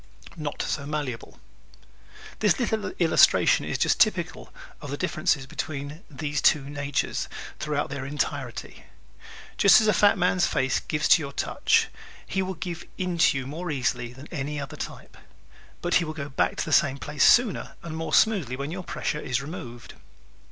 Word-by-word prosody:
Not 150 -3 -4
So 140 -1 -3
Malleable 145 -6 -5 1.0
¶ - - -29
This 210 +1 +3
little 220 -3 -1
illustration 165 -2 +4
is - - -2
typical - - +1 0.3
of - - -7
the - - -3
differences 135 - 0
between 145 +3 -5
these 145 -1 -3
two 150 - +4
natures 145 -1 -2 0.3
throughout 150 -2 -2
their 140 -1 -4
entirety. 140 -3 -4 0.7
Just 200 - +7
as 220 - +1
the 215 - +4
fat 205 -1 +4
man's 180 -1 +2
face 130 0 +1
gives 150 -1 -1
to 180 -2 +7
your 140 -2 -5
touch, - - +1 0.4
he 190 - -1
will 190 0 -3
give 170 0 -5
in 180 -2 -2
to 165 -5 +4
you 130 - -4
more 165 +6 -5
easily 125 -4 -1
than 130 +3 -12
any 145 -1 -3
other 140 +2 -6
type; - - -8 0.7
but 175 - -1
he - - 0
will 155 -1 -4
go 145 -2 -5
back 135 - 0
to - - -2
the - - -5
same 135 0 +4
place 150 0 -1
sooner 240 -5 +4
and 165 -2 -6
more 160 -1 -4
smoothly 175 - +3
when 140 +3 -5
your 185 +1 -5
pressure 150 - -3
is 130 -1 -1
removed. 125 -5 -8
150 Hz, 175 wpm, -26 LUFS, 140-175 Hz, 1.0 s, Just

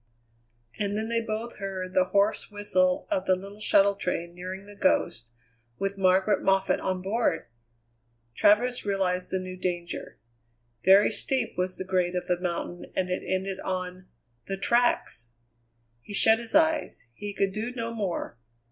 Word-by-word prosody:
And 205 0 -1
then 220 +1 -2
they 230 0 +1
both 225 +1 -4
heard 190 -2 -5
the 185 -1 +4
hoarse 200 +3 +1
whistle 275 +7 +1
of 290 -2 0
the 185 - +5
little 200 +3 -10
shuttle 200 -2 +4
train 175 -3 -3
nearing 185 +2 -7
The 205 0 -12
Ghost, 150 - +1 0.5
with 195 0 -2
Margaret 190 +1 +3
Moffatt 195 0 +2
on 185 -1 -2
board! 200 -4 0 0.9
Travers 240 - +3
realized 185 -3 0
the 190 - +1
new 185 0 -6
danger. 175 -2 -4 0.7
Very 195 +4 +6
steep 260 +4 0
was 185 0 -2
the 185 - -5
grade 185 -1 0
of 180 0 -2
the 180 -1 0
mountain, 175 0 -4
and 185 -1 0
it 180 - -1
ended 190 0 -2
on 185 0 -4 0.4
the 195 - -3
tracks! 235 - +1 0.7
He 205 - -7
shut 220 +2 +5
his 235 +4 -3
eyes; 315 0 +2
he 205 - -6
could 195 -1 0
do 220 +4 -3
no 230 -1 -3
more. 190 - -3
195 Hz, 155 wpm, -27 LUFS, 185-215 Hz, 0.9 s, Very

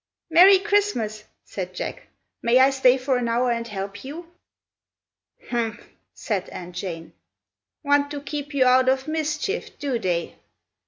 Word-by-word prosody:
"Merry 370 +4 +8
Christmas!" 375 - 0 0.2
said 185 -2 -6
Jack. - - -6 0.3
"May 235 +2 +3
I 265 +1 +6
stay 265 -1 +4
for 260 0 0
an 245 -1 -1
hour 240 +2 +1
and 230 0 -2
help 200 -1 -6
you?" 330 +5 -9 1.2
"Humph!" 230 -2 -3 0.3
said 200 -5 -3
Aunt 175 0 -9
Jane. 165 -3 -6 0.7
"Want 285 0 +2
to 290 0 -5
keep 290 +1 -6
you 275 -3 +2
out 255 +1 +5
of 265 +1 0
mischief, 310 +6 -3
do 270 -5 -2
they? 175 -5 -2
255 Hz, 145 wpm, -23 LUFS, 215-290 Hz, 1.2 s, Merry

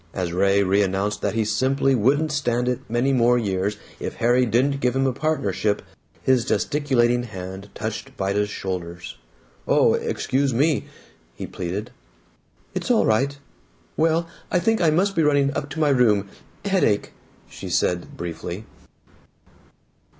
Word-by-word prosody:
As 90 -3 -2
Ray 100 +2 +3
reannounced 100 +1 +1
that - - -1
he 110 -1 +1
simply 130 +5 +1
wouldn't 140 +7 +2
stand 125 -4 0
it 125 -1 0
many 120 +4 +1
more 125 -1 +4
years 100 -2 -1 0.2
if - - -5
Harry 120 +2 +3
didn't 135 +5 +2
give 125 -1 0
him 135 0 +2
a 130 - +1
partnership, 120 -9 -1 0.4
his 130 -3 +3
gesticulating 130 -3 +1
hand 95 -3 -8
touched 110 +5 -4
Vida's 100 +1 0
shoulders. 90 -5 -5 0.5
"Oh, - - +4
excuse 135 -1 0
me!" 145 +3 +2 0.5
he - - -6
pleaded. 95 +4 -5 0.8
"It's - - -3
all - - +4
right. 135 +6 +1 0.6
Well, 165 +1 +2 0.2
I - - +2
think 225 +4 +1
I 165 - +4
must 190 +6 +2
be 165 - +3
running 145 -2 +2
up 145 - -3
to 150 +4 -6
my 150 -2 +3
room. 110 -7 +3 0.4
Headache," 185 - +1 0.3
she - - -8
said 90 -1 -1
briefly. 85 +4 -5
120 Hz, 145 wpm, -23 LUFS, 100-140 Hz, 0.8 s, more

